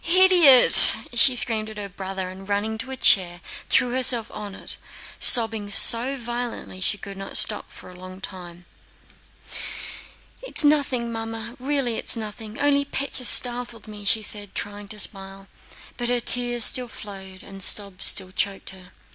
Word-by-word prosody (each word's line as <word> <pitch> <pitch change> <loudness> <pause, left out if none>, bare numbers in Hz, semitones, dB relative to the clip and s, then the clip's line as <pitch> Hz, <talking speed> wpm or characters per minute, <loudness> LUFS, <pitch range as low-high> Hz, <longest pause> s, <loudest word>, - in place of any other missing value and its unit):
"Idiot!" 350 -7 +7 0.2
she 250 +2 +5
screamed 220 0 +3
at 215 - -13
her 205 -1 -8
brother 190 -1 -8
and, 190 +1 -15
running 215 +2 -4
to 255 - -6
a 265 - -9
chair, 175 -6 +2 0.3
threw 245 - +1
herself 245 -3 -2
on 205 -2 -10
it, - - -6 0.4
sobbing 225 -4 +1
so 240 +6 +3
violently 240 -4 -8
that 185 - -8
she 205 - -2
could 200 0 -12
not 195 0 -5
stop 210 -1 -1
for - - -14
a - - -17
long 185 +1 -14
time. 175 -2 -11 1.8
"It's - - -1
nothing, 275 -5 -1
Mamma, 225 +1 -9
really 260 -3 -4
it's - - -3
nothing; 215 0 -10
only 285 -1 0
Pétya 275 -2 -4
startled 240 -2 +1
me," 210 -1 -12
she 215 +2 0
said, 205 -1 -5
trying 205 0 -8
to 210 +1 -7
smile, 195 -1 -1 0.5
but 240 -1 -5
her 245 0 -1
tears 240 -1 +2
still 255 -2 +2
flowed 190 -4 -13
and 195 0 -14
sobs 200 -1 0
still 185 -1 +1
choked 195 +1 -5
her. 185 -1 -17
220 Hz, 165 wpm, -20 LUFS, 195-245 Hz, 1.8 s, Idiot